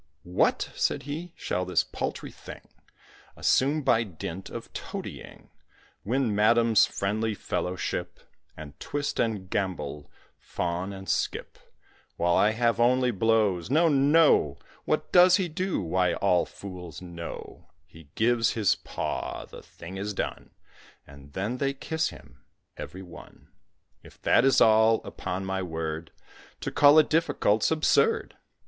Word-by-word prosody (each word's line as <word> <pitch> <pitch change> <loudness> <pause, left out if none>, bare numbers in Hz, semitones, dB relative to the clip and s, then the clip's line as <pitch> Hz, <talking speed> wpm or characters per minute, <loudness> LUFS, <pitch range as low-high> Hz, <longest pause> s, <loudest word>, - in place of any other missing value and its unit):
"What!" 90 +1 0
said - - -1
he, 160 +5 -6
"shall 90 - -2
this 90 0 +1
paltry - - -5
thing - - -11 0.8
Assume 145 +3 +2
by 120 -4 +3
dint 95 -1 -7
of - - -9
toadying, - - -8 0.5
Win 120 0 0
Madam's 115 +1 +4
friendly 105 +2 -2
fellowship, 90 -2 -3 0.4
And 75 -2 -10
twist 145 0 -3
and 105 -5 -1
gambol, 75 -7 -3 0.3
fawn 90 +3 -3
and 95 0 -9
skip, - - -2 0.6
While 85 0 +2
I 105 - +4
have 115 +1 +1
only 125 +1 +3
blows? 105 -4 +1
no, 160 +5 +4
no! 140 - +4 0.3
What - - -1
does 180 0 +7
he 190 -2 0
do? 180 +4 -2
why, 90 -1 0
all 90 -3 +2
fools 90 -4 -9
know 85 -1 -9 0.2
He 80 -3 -17
gives 115 -1 +2
his 110 -4 +2
paw; - - -5
the - - -12
thing 90 +3 -10
is 100 +1 -4
done, - - -4 0.6
And 70 +1 -15
then 105 +7 -2
they 140 -1 0
kiss 160 +3 -2
him - - -15 0.3
every 95 +1 -8
one. 90 - -14 0.5
If - - -17
that 120 - +4
is 135 - +4
all, 110 0 +5
upon 95 +2 -5
my 95 0 -2
word, 80 -2 -4 0.5
To - - -3
call 145 +1 +6
it 155 - +6
difficult 135 -9 +1
's - - +3
absurd." 305 - +2
105 Hz, 140 wpm, -27 LUFS, 90-130 Hz, 0.8 s, does